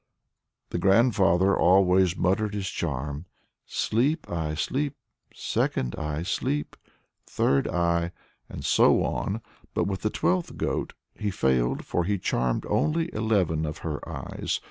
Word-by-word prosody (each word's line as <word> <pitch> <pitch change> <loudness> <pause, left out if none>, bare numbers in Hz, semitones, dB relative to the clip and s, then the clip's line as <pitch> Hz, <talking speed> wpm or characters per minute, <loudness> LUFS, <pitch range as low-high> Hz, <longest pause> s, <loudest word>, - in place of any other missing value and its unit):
The - - -1
grandfather 95 -2 +4
always 90 -1 +4
muttered 105 +3 +1
his 100 -2 -2
charm 75 +1 -3 0.4
'Sleep, 140 +8 0
eye! 80 -3 -2
Sleep, 140 - -1 0.4
second 60 -1 -1
eye! 75 0 -3
Sleep, 75 -4 -2 0.5
third 70 0 +1
eye!' 85 0 +1 0.4
and - - -7
so - - +4
on. 100 - -2 0.3
But - - +2
with 95 -1 -2
the 110 - +1
twelfth 90 -2 0
goat - - -2 0.2
he 105 - -3
failed, 65 -9 +1
for 90 - 0
he 100 +2 +1
charmed 60 -8 -1
only 165 +2 0
eleven 100 -8 +1
of 75 -1 -3
her 75 -3 -2
eyes. - - -3
90 Hz, 130 wpm, -26 LUFS, 75-105 Hz, 0.5 s, grandfather